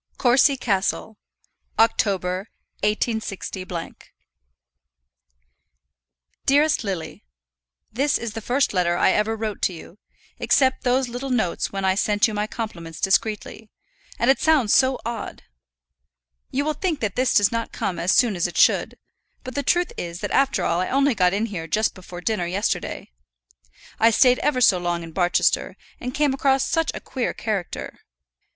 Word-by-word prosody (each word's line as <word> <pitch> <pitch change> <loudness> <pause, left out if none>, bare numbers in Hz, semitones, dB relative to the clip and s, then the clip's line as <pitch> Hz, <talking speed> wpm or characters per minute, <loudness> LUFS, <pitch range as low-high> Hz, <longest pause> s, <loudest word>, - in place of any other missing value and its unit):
Courcy 265 +2 +4
Castle, 205 -1 -1 0.6
October, 195 -3 +1 0.3
186. 215 -1 -2 3.0
DEAREST 295 +1 +3
LILY, 190 - -5 0.7
This 275 +5 +1
is 230 -2 -5
the 225 - -5
first 250 +3 0
letter 175 -2 +1
I - - +4
ever 215 +1 +1
wrote 215 -2 -4
to 185 - +1
you, 170 +4 -12 0.4
except 260 -1 +2
those 255 +1 +2
little 245 +3 -5
notes 220 -9 -1
when 195 -1 -3
I 190 - +3
sent 205 +3 +2
you 220 - -5
my 210 0 -1
compliments 170 -9 -6
discreetly, 210 +2 -1 0.5
and 240 +3 +4
it 270 - 0
sounds 295 -9 +3
so 260 0 +3
odd. 235 0 -5 1.1
You 280 +3 -1
will 310 - 0
think 320 -1 -2
that 210 -4 -2
this 255 0 +1
does 205 -1 +4
not 230 -1 -3
come 180 -4 -3
as 175 +3 +1
soon 235 -6 +3
as 175 0 0
it 175 - -8
should; - - +3 0.5
but 255 - -7
the 285 - -1
truth 350 +6 +1
is 170 0 -5
that - - -3
after 275 0 +2
all 170 - +1
I 185 - -1
only 275 +1 +2
got 180 -4 +2
in 205 +4 0
here 180 -7 -6
just 215 +7 +1
before 180 -1 -10
dinner 180 -3 -1
yesterday. 190 - -3 0.9
I 225 - +6
stayed 250 +2 +4
ever 260 -4 0
so 190 -6 +5
long 175 -1 -2
in 165 - -9
Barchester, 175 +1 +1 0.2
and 250 - -4
came 290 0 +1
across 270 0 +2
such 325 +1 0
a - - -4
queer 255 -3 -3
character. 205 -6 -4
220 Hz, 160 wpm, -23 LUFS, 190-260 Hz, 3.0 s, I